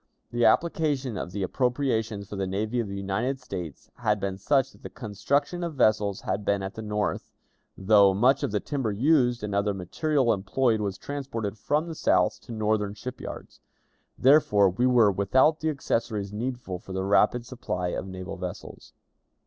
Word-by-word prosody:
The 120 0 +1
application 145 -7 +1
of 90 - -5
the 100 +1 -3
appropriations 115 -3 -1
for 105 - -7
the 95 -1 -2
Navy 105 +5 -1
of 115 - -1
the 100 0 -5
United 105 +8 -2
States 90 - -7
had 105 -3 +1
been 95 -1 -2
such 135 +6 +2
that - - -21
the - - -8
construction 135 - -2
of 170 -3 -4
vessels 105 -5 +2
had 100 - -2
been 100 -1 0
at 95 - -5
the 110 - -7
North, 105 -1 -2 0.5
though 100 0 +5
much 125 +8 +3
of - - 0
the 105 - 0
timber 135 -5 -2
used 125 0 +2
and 105 -1 -3
other 100 0 +1
material 130 - +1
employed 110 +4 +1
was 100 -2 -2
transported 115 -8 -4
from 150 +8 0
the 165 - -6
South - - +1
to 120 - -11
Northern 105 -2 0
ship 125 +4 -7
yards. - - -9 0.6
Therefore, 105 -9 +5
we 120 +8 +1
were 120 -5 +5
without 130 - +3
the 160 -1 0
accessories 110 -8 -2
needful 120 -4 -4
for 95 - -10
the 95 0 -2
rapid 105 +4 +3
supply 90 -8 -3
of 95 - -4
naval 95 0 -7
vessels. 90 -1 -8
110 Hz, 180 wpm, -26 LUFS, 100-130 Hz, 0.6 s, though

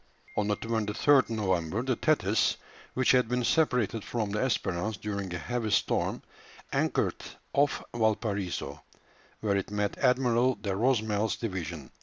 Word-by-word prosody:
On 105 - 0
the 105 -1 +1
23rd 115 +5 +2
November 95 -2 0
the 130 -1 0
Thetis, 115 - +2 0.4
which 130 0 +4
had 125 -3 +3
been 125 0 0
separated 125 -7 +1
from 110 -4 -2
the 105 - -1
Espérance 105 -5 -1
during 100 -3 -4
a 90 - -2
heavy 115 +6 -2
storm, 100 - +1 0.5
anchored - - 0 0.3
off 140 0 +2
Valparaiso, 105 -4 -1 0.6
where 105 -2 +1
it 100 - -3
met 105 0 -2
Admiral 125 0 +3
de 100 - -4
Rosamel's 110 -3 +1
division. 85 - -5
110 Hz, 135 wpm, -29 LUFS, 100-125 Hz, 0.6 s, which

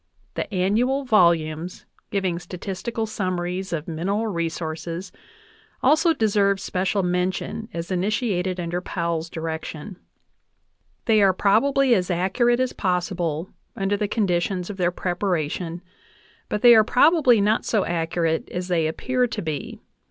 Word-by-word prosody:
The - - -4
annual 220 +9 +1
volumes 170 -6 +2 0.2
giving 185 -4 -1
statistical 195 +5 -4
summaries 185 -3 -3
of 160 -2 -3
mineral 190 +7 -1
resources 170 -1 -4 0.7
also 310 +5 +4
deserve 200 -7 +2
special 190 0 -1
mention 180 +5 -2
as 170 +2 -5
initiated 185 -1 -1
under 175 +1 -2
Powell's 170 -3 -3
direction. 160 +2 -6 1.1
They 220 -2 +4
are 195 -1 +5
probably 255 +7 +3
as 185 -4 +1
accurate 215 +8 +2
as 255 -1 0
possible 180 -2 -2 0.2
under 195 +1 0
the 205 0 -1
conditions 185 -2 -1
of 195 - -9
their 175 -2 +2
preparation, 175 -2 -2 0.7
but 210 - -2
they 240 -1 +9
are 220 -1 +7
prob 255 +9 +4
ably 250 -7 +5
not 210 +2 +2
so 215 -4 +1
accurate 165 -1 -1
as 180 +1 -4
they 165 -3 +2
appear 250 +10 0
to - - -4
be. 155 -3 -5
185 Hz, 130 wpm, -23 LUFS, 170-215 Hz, 1.1 s, they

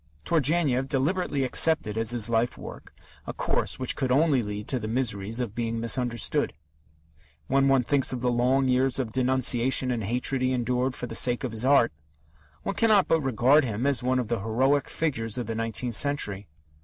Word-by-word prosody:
Turgenev 145 -4 +1
deliberately 145 +1 -1
accepted 130 -4 +3
as 115 -1 -1
his 120 -2 +2
life 115 +1 0
work - - -11 0.4
a - - -4
course - - -2
which 130 -1 -2
could 130 -2 -2
only 140 -1 +3
lead 105 -1 -6
to 130 - 0
the 110 - -5
miseries 110 -2 -2
of 120 -5 -3
being 115 0 -3
misunderstood. 115 - 0 0.9
When 135 +1 +2
one 135 -2 +3
thinks 135 +2 +1
of 125 -2 -4
the 125 0 0
long 130 +3 +1
years 130 0 +1
of 120 -5 -3
denunciation 130 0 +2
and 115 -3 -3
hatred 125 +5 -1
he 130 0 +1
endured 125 +1 -1
for - - -5
the - - -8
sake 125 +2 +2
of 130 - -3
his 110 +2 -3
art, 135 -3 +4 0.7
one 200 - -3
cannot 215 -3 +3
but 160 - +2
regard 135 +3 +3
him 115 0 -3
as 140 -4 +1
one 130 +1 0
of 125 -3 -2
the 120 -1 -2
heroic 130 +7 0
figures 115 -8 -3
of 120 - -3
the 115 - -4
nineteenth 115 +2 -3
century. 105 -7 0
125 Hz, 190 wpm, -26 LUFS, 115-135 Hz, 0.9 s, art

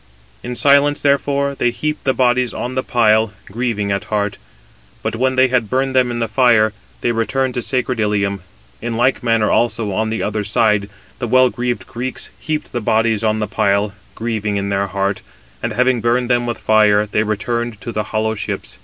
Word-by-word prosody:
In 125 - -5
silence, 140 +2 +4
therefore, 140 0 +1
they 120 -3 +1
heaped 150 +6 -3
the 135 - +4
bodies 125 -1 +2
on 125 - -4
the 130 - 0
pile, 110 -3 +2
grieving 105 -2 -2
at 100 0 -2
heart. 105 -1 -2 0.6
But - - -2
when 130 +3 +1
they 130 0 +5
had 120 -4 +1
burned 130 +1 0
them 130 -1 +4
in 120 - -3
the 115 -1 -1
fire, 110 -2 +3 0.3
they 120 - +1
returned 125 +3 0
to 125 - -2
sacred 125 -1 -1
Ilium. 100 -2 0 0.4
In 115 -1 -3
like 125 +3 +2
manner 115 -2 +2
also, 115 -3 +1
on 110 +3 -1
the 110 - -2
other 105 0 -1
side, 105 -1 +1 0.3
the 120 - -2
well 130 +1 +4
greaved 120 0 -3
Greeks 125 +2 -6
heaped 155 -1 -3
the 120 - -3
bodies 110 0 +1
on 110 -1 +2
the 110 - -1
pile, 100 +1 +1 0.2
grieving 110 -3 -2
in 100 0 -2
their 100 0 0
heart; 100 +1 -2 0.4
and 115 - -2
having 125 +1 +2
burned 120 +2 +1
them 120 0 +2
with 120 - -2
fire, 105 -1 +3
they 105 0 0
returned 110 +1 -2
to 120 - -5
the 105 -1 -2
hollow 110 0 -1
ships. 65 - -5
115 Hz, 195 wpm, -18 LUFS, 105-125 Hz, 0.6 s, they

